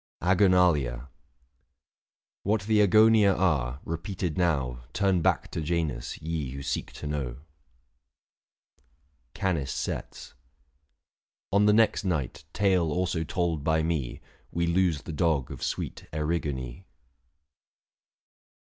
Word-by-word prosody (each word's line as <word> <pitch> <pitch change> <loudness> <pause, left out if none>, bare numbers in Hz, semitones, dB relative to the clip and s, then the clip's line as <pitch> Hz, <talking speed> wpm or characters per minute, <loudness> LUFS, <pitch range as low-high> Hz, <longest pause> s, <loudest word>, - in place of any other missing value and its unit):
AGONALIA. 90 -10 +3 1.3
What 105 0 0
the 105 0 +3
Agonia 110 0 +5
are, 70 -8 0
repeated 85 +1 -3
now 70 -9 0
Turn 95 -3 +2
back - - +1
to - - -3
Janus, 80 -6 -2
ye 80 -4 -3
who 70 0 -6
seek - - -3
to - - -8
know. 70 -5 -3 2.0
CANIS 85 -9 -1
SETS. - - -5 1.2
On 105 +1 +5
the 105 - +6
next 110 0 +3
night, 75 -6 -2
tale 95 -5 +2
also 90 0 0
told 80 -2 -1
by 80 +1 +2
me, 80 -7 -2 0.3
We 85 0 -1
lose 85 -3 +1
the 80 - -6
dog 75 -5 +1
of - - -8
sweet - - -4
Erigone. 75 -2 -3
85 Hz, 110 wpm, -27 LUFS, 70-95 Hz, 2.0 s, the